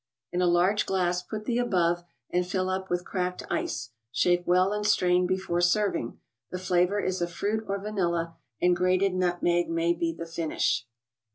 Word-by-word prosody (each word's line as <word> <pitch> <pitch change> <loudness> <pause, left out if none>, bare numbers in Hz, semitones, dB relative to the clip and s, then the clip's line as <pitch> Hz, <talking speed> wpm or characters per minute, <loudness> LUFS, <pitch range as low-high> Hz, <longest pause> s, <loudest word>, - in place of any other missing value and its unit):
In 180 - 0
a 180 - +3
large 180 +5 +3
glass 180 -2 +1
put 215 +4 -6
the 240 +1 0
above, 175 -7 +1 0.3
and 180 0 +2
fill 185 +1 -1
up 190 0 -3
with 175 0 -1
cracked 180 -1 -2
ice; 320 - -2 0.2
shake 175 +7 +2
well 185 +3 +3
and 210 0 -2
strain 180 -3 +3
before 185 -2 -1
serving. 175 - +1 0.3
The 180 - -4
flavor 185 +2 +1
is 185 -2 -1
a 175 - +1
fruit 205 +6 -2
or 200 0 -1
vanilla, 170 -5 -2 0.2
and 180 0 +3
grated 185 +2 +2
nutmeg 175 -1 +1
may 165 +1 +1
be 170 -1 -1
the 165 0 -7
finish. 160 -9 -1
180 Hz, 175 wpm, -27 LUFS, 175-190 Hz, 0.3 s, a